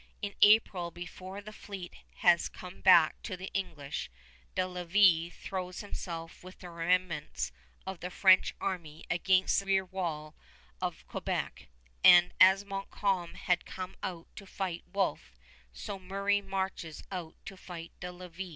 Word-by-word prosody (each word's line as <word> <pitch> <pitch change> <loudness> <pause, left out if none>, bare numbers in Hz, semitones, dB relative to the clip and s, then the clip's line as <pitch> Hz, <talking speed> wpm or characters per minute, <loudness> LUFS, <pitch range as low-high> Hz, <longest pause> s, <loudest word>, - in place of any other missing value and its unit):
In 200 -1 -3
April, 205 -5 +5
before 185 +3 -8
the 215 +1 -10
fleet 195 -4 -8 0.2
has 175 -1 +4
come 180 +1 -11
back 175 -4 +6
to 185 - -5
the 185 +1 -7
English, 155 - -4 0.5
De 185 - +2
Lévis 180 -1 +3
throws 185 -1 -5
himself 170 -6 -7
with 185 +1 -11
the 180 -2 -10
remnants 170 - -1 0.3
of 190 -2 -5
the 180 - -5
French 185 0 +5
army 165 -5 -4
against 185 +2 +3
the 195 - -8
rear 190 -1 +3
wall 165 -5 -4 0.5
of - - -3
Quebec; - - -3 0.4
and 175 0 +8
as 190 +2 +7
Montcalm 195 -2 -2
had 180 -1 0
come 185 0 -7
out 170 -3 -5
to 200 - -9
fight 185 -3 -4
Wolfe, 195 -1 -1 0.4
so 200 -3 -6
Murray 200 +2 0
marches 190 -5 -4
out 175 -4 -5
to 195 - -8
fight 170 -3 -9
De 180 - -5
Lévis. 180 +1 -8
185 Hz, 145 wpm, -31 LUFS, 170-195 Hz, 0.5 s, and